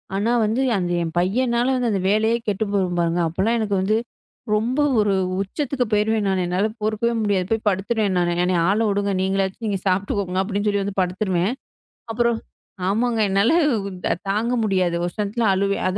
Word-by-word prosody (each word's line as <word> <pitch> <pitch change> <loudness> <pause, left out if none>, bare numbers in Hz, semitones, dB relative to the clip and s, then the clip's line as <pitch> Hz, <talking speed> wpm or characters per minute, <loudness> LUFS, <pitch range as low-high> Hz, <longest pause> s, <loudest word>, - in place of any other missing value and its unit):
ஆனா 210 +4 +1
வந்து 225 +5 0 0.2
அந்த 175 -2 -2
என் 165 -1 -3
பையன்னால 235 +7 +1 0.2
அந்த 195 -2 0
வேலையை 220 +3 +2
கெட்டு 205 +1 0
போயிரும் 180 -3 0
பாருங்க. 170 0 +1
அப்ப 165 +3 -8
எல்லாம் 230 +4 +2
எனக்கு 205 -2 -1
வந்து 215 +3 +2 0.6
ரொம்ப 235 +6 0 0.2
ஒரு 210 -1 +2 0.3
உச்சத்துக்குப் 250 +3 -2
போயிருவேன் 210 0 +1
நானு 190 -1 +1
என்னால 185 +4 +1
பொறுக்கவே 215 +2 0
முடியாது. 195 -3 +1
போய் 225 0 0
படுத்துருவேன் 200 +1 0
நானு. 175 0 +1
என்னய 180 -1 +1
ஆள 205 +2 +2
விடுங்க. 200 0 0
நீங்கச் 195 +1 -1
சாப்பிட்டுக்கோங்க 190 0 0
அப்படின்னு 205 +1 -2
சொல்லி 205 -1 +1
வந்து 200 0 -5
படுத்துருவேன். 185 +1 0 0.6
அப்புறம் 235 0 +1 0.5
ஆமாங்க. 230 +3 +1
என்னால 200 +4 +3 0.8
தாங்க 220 +5 0
முடியாது. 185 -4 +1
ஒரு 175 - -4
இடத்துல 210 +3 -1
அழுவேன். 200 +1 0
200 Hz, 160 wpm, -22 LUFS, 190-220 Hz, 0.8 s, என்னால